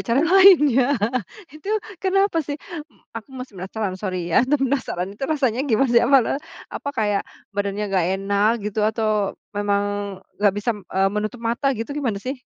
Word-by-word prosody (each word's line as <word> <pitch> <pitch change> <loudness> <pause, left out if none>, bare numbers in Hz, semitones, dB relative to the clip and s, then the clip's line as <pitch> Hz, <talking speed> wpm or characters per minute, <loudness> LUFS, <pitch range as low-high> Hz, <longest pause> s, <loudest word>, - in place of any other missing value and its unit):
cara 235 +4 +3
lain, 365 -5 +7
ya. 265 +3 +3 0.6
Itu, 310 +5 -10 0.3
kenapa 390 -2 +2
sih? 290 -1 -4 0.3
M 225 - -28 0.2
aku 230 +3 -8
masih 255 -4 -8
penasaran, 195 0 -3
sorry 185 -4 -3
ya. - - +6
Penasaran, 265 -10 0
itu 205 - -14
rasanya 260 -6 +1
gimana, 245 +2 +2
sih? 235 - +6
Apa 270 +4 +5
la - - -1 0.4
apa 285 - -5
kayak, 205 -2 +1 0.3
badannya 200 +1 -2
nggak 180 -3 +2
enak, 200 +2 +2
gitu, 210 +1 -2
atau 215 -2 0 0.2
memang, 205 0 0 0.6
nggak 205 -2 +4
bisa, 210 +2 -1
eee, 195 +1 +2
menutup 215 +3 -3
mata 235 +5 0
gitu? 225 +3 -5
Gimana 260 -8 -2
sih? 260 +1 -4
225 Hz, 165 wpm, -22 LUFS, 205-275 Hz, 0.6 s, lain